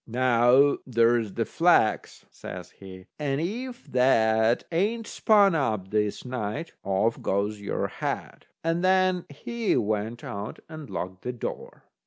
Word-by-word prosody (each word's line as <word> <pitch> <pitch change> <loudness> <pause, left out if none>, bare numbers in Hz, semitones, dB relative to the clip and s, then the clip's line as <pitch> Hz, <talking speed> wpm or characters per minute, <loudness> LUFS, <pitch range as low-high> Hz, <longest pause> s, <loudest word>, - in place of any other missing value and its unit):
"Now, 125 +3 +4
there's 115 -3 +2
the - - 0
flax," - - +2
says - - -9
he, 95 -1 -12
"and 140 -2 -1
if 240 +9 -4
that 115 -3 +3
ain't 215 +7 0
spun 205 -3 +4
up 110 - -1
this 105 +1 -1
night, 125 +5 -4
off 100 +4 0
goes 100 +2 -1
your 100 - -2
head." - - -5 0.2
And 165 +2 0
then 185 -1 +3
he 230 - -2
went 110 +1 -2
out 100 +1 -6
and 155 -2 -9
locked 90 +1 -5
the 125 - -4
door. 120 - -7
125 Hz, 135 wpm, -26 LUFS, 105-165 Hz, 0.2 s, Now